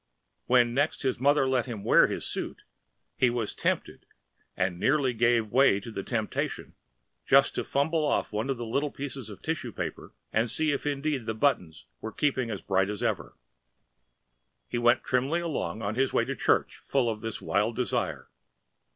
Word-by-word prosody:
And - - -49
when 120 -1 +4
next 145 +4 0
his 130 -2 0
mother 140 +1 +3
let 130 -1 +1
him 110 -5 -6
wear - - +6
his - - -3
suit, - - -4 0.5
he 130 - +3
was 120 -3 -2
tempted - - -2 0.5
and 90 -1 0
nearly 135 0 +2
gave 115 -2 +2
way 130 -6 +5
to 110 +3 -9
the 100 - -4
temptation 110 +1 -3 0.5
just - - +5
to - - -2
fumble 155 +3 0
off 145 - 0
one 110 +4 -1
little 135 +2 -1
bit 135 -4 -6
of 100 - -10
tissue 155 -7 -3
paper - - -6 0.2
and 115 +2 +2
see 155 +6 +1
if 145 +1 -2
indeed 140 -3 -1
the 110 - -1
buttons 90 - 0
were 110 - -6
keeping 130 0 0
as 105 -3 -5
bright 95 +1 +1
as 105 -1 -4
ever. - - -2 1.3
He 120 - -2
went 120 0 +4
trimly 135 +7 +1
along 115 - -3
on 100 +1 -1
his 130 +3 +1
way - - +2
to - - -3
church - - +1
full 135 -3 +1
of 110 -2 -2
this 115 -1 -4
wild 105 +4 0
desire. 125 +1 -2
120 Hz, 175 wpm, -28 LUFS, 110-140 Hz, 1.3 s, wear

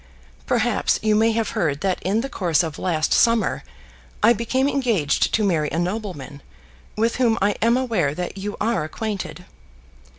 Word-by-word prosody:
"Perhaps - - +1
you 215 -1 +3
may 225 +1 +3
have 225 -1 -1
heard 145 -3 -1
that 190 -2 -1
in 200 +5 0
the 270 - -3
course 175 - +1
of 160 -2 -5
last 160 -4 0
summer 230 -1 +2 0.6
I 230 +3 +7
became 255 +4 0
engaged 230 - +1
to 220 - +1
marry 160 -7 +1
a 160 - -3
nobleman, 175 - -4 0.6
with 230 +2 +1
whom 235 -3 +2
I 200 +2 +2
am 235 +3 +3
aware 210 - 0
that 180 +2 -4
you 200 +1 -5
are 225 -4 0
acquainted." 190 +1 -5
205 Hz, 165 wpm, -22 LUFS, 170-230 Hz, 0.6 s, I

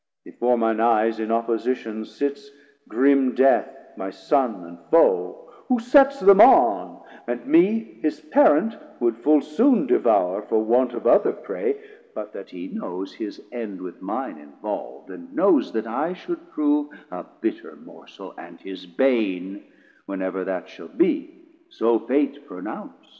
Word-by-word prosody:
Before 120 0 0
mine 115 -1 0
eyes 115 -1 +2
in 110 0 -3
opposition 115 -1 -2
sits 140 +2 -5 0.4
Grim 135 +2 +2
Death 135 0 +4 0.3
my 95 - -6
Son 100 - -1
and 85 0 -13
foe, 480 - +2 0.2
who 255 - +2
sets 275 +3 +4
them 200 +1 +7
on, - - +4 0.2
And 120 0 -4
me 210 +7 +2
his 155 -1 -2
Parent 165 - +3 0.2
would 120 -1 +1
full 150 +5 +3
soon 230 - +2
devour 90 +3 +2
For 110 +1 0
want 120 +2 +2
of 115 - -7
other - - +4
prey, 430 -3 -4 0.4
but - - -7
that - - -10
he 285 - -9
knows 95 - -7
His 105 - -8
end 115 -5 -6
with 90 -1 -10
mine - - -5
involvd; 70 -4 -8
and 265 +1 -12
knows 310 0 +3
that 110 0 -2
I 150 +10 -2
Should 340 - -8
prove 295 -2 0 0.2
a - - -7 0.2
bitter 335 0 -4
Morsel, - - -14
and - - -13
his 95 -1 -10
bane, 100 -3 -1 0.4
When 95 -1 -4
ever 95 0 -3
that 95 -1 -4
shall 95 - -13
be; 330 -1 -1 0.3
so 115 - +1
Fate 145 +3 -1
pronounc'd. 90 -6 -10
130 Hz, 150 wpm, -23 LUFS, -, 0.4 s, them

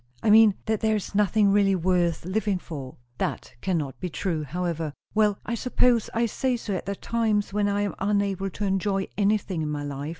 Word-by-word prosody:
"I 215 - +4
mean, 215 -2 +7
that 220 -1 0
there 220 0 +2
is 210 - -4
nothing 205 0 +3
really 200 -1 +4
worth 175 -2 +1
living 200 +1 0
for." 140 -7 -8 0.2
"That - - -3
cannot 155 -8 -2
be 180 - -3
true, 165 -2 -2
however." 165 0 -3 0.2
"Well, 210 -2 +3
I 235 - -3
suppose 245 -1 +2
I 230 +1 +1
say 250 +2 -1
so 215 -3 -4
at 185 - -4
the 200 - -2
times 215 -2 0
when 205 0 +1
I 200 0 0
am 205 - -1
unable 195 -1 0
to 205 +3 -4
enjoy 195 0 0
anything 200 -4 +1
in 155 - -2
my 145 -1 -3
life. 145 +1 -5
200 Hz, 200 wpm, -26 LUFS, 175-210 Hz, 0.2 s, mean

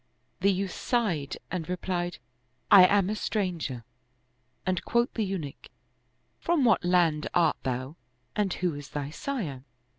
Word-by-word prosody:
" - - -44
The 200 +2 +5
youth 190 0 -1
sighed 185 - -1
and 180 -2 -3
replied, 175 -1 -2 0.3
" 125 +1 -44
I 185 -2 +10
am 200 -2 +3
a 210 - -1
stranger 175 - -2 0.4
"; 125 0 -44
and 185 -1 0
quoth 235 +1 +1
the 225 - 0
Eunuch, 185 -8 -5 0.4
" - - -44
From 335 -6 +3
what 225 -4 +4
land 175 -4 +2
art 170 -3 +4
thou 130 +4 -3 0.4
and 205 -3 +1
who 180 -2 -1
is 145 0 -8
thy 145 -1 -4
sire?" 155 - -4
180 Hz, 160 wpm, -28 LUFS, 145-200 Hz, 0.4 s, I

